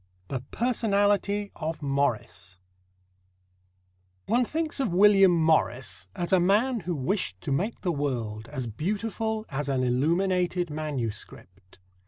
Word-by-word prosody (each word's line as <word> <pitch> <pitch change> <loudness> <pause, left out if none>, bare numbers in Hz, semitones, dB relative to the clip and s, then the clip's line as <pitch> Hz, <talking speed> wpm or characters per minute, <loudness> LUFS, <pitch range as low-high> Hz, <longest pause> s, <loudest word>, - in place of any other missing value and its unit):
THE 130 - -2
PERSONALITY 205 -3 +1
OF 155 -1 -4
MORRIS 135 -9 -2 1.7
One 245 +2 +2
thinks 315 +4 -2
of 265 - 0
William 195 -1 +6
Morris 160 -6 +1
as 175 -1 -2
a 185 - +6
man 215 +8 +2
who 175 -2 -3
wished 140 - -2
to 140 - -4
make 195 +12 -1
the 180 - 0
world 120 -7 -3
as 135 -4 -4
beautiful 215 - -2
as 140 +1 -3
an 130 -2 +1
illuminated 175 +6 +1
manuscript. 115 -10 -6
170 Hz, 120 wpm, -27 LUFS, 135-205 Hz, 1.7 s, William